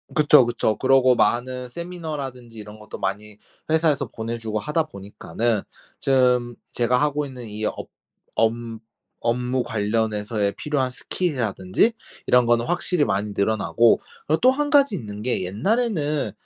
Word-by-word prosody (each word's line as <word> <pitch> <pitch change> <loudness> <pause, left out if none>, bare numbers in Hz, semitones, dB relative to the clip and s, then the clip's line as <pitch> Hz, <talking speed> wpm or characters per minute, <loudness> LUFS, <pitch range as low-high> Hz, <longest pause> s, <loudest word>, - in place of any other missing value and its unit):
그쵸, 150 -4 +6
그쵸. 120 -2 0
그러고 130 -1 +4
많은 125 +1 0
세미나라든지 145 -8 -6
이런 105 0 -10
것도 105 - -9
많이 105 +2 -4 0.3
회사에서 155 -4 +2
보내주고 110 -1 -4
하다 150 +6 0
보니까는 105 -1 -3 0.4
좀 125 -3 +2
제가 125 +1 +1
하고 150 0 0
있는 125 -4 -9
이 105 +1 -5
업 - - -4 0.5
업 110 0 +3 0.7
업무 125 +2 0
관련해서의 105 -1 -1
필요한 140 -4 -1
스킬이라든지 125 - 0 0.3
이런 125 -1 +5
거는 120 0 +3
확실히 175 -1 +1
많이 100 +2 -1
늘어나고 110 +3 +3 0.3
그리고 155 +2 +2
또 255 - +6
1 290 +2 -1
가지 280 -7 +4
있는 105 - -7
게 120 -5 -1
옛날에는 150 - 0
125 Hz, 315 characters per minute, -23 LUFS, 110-150 Hz, 0.7 s, 그쵸